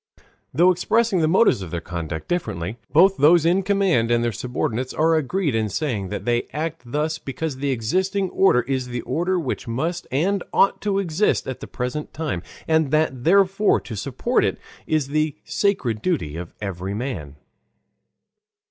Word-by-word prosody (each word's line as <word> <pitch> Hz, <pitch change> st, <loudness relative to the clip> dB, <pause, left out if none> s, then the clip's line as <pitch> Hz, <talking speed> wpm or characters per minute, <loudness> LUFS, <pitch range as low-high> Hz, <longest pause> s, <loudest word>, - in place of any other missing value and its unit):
Though 175 Hz, +7 st, +5 dB
expressing 220 Hz, +3 st, +1 dB
the 155 Hz, -, +3 dB
motives 185 Hz, -, +4 dB
of 90 Hz, -, -6 dB
their 85 Hz, -, -3 dB
conduct 85 Hz, -2 st, -5 dB
differently, 110 Hz, -, -3 dB
both 190 Hz, +5 st, +5 dB
those 160 Hz, +3 st, +5 dB
in 180 Hz, +3 st, +3 dB
command 190 Hz, -, +2 dB
and 120 Hz, 0 st, +2 dB
their 120 Hz, -, +1 dB
subordinates 125 Hz, +2 st, -3 dB
are 160 Hz, +1 st, +3 dB
agreed 160 Hz, 0 st, 0 dB
in 110 Hz, -1 st, 0 dB
saying 105 Hz, -6 st, -2 dB
that 105 Hz, -, -5 dB
they 120 Hz, 0 st, 0 dB
act 160 Hz, +2 st, -3 dB
thus 155 Hz, +2 st, -1 dB
because 145 Hz, 0 st, -4 dB
the 140 Hz, +1 st, -2 dB
existing 185 Hz, -, 0 dB
order 190 Hz, -10 st, +4 dB
is 130 Hz, 0 st, -2 dB
the 120 Hz, -1 st, -4 dB
order 180 Hz, +7 st, -1 dB
which 140 Hz, -7 st, -4 dB
must 165 Hz, +10 st, -2 dB
and 180 Hz, +9 st, +1 dB
ought 195 Hz, -, +3 dB
to 205 Hz, -2 st, 0 dB
exist 190 Hz, +1 st, +1 dB
at 130 Hz, -, -4 dB
the -, -, -8 dB
present 125 Hz, +5 st, -4 dB
time, 150 Hz, -, -2 dB, 0.3 s
and 160 Hz, -3 st, +2 dB
that 135 Hz, -4 st, +1 dB
therefore 195 Hz, +3 st, +4 dB
to 115 Hz, -, -7 dB
support -, -, 0 dB
it -, -, 0 dB, 0.3 s
is 155 Hz, -3 st, 0 dB
the 155 Hz, 0 st, 0 dB
sacred 135 Hz, -, 0 dB
duty 120 Hz, -, -1 dB
of 85 Hz, 0 st, -7 dB
every 95 Hz, -1 st, -4 dB
man. 105 Hz, -, -5 dB
150 Hz, 170 wpm, -22 LUFS, 120-175 Hz, 0.3 s, Though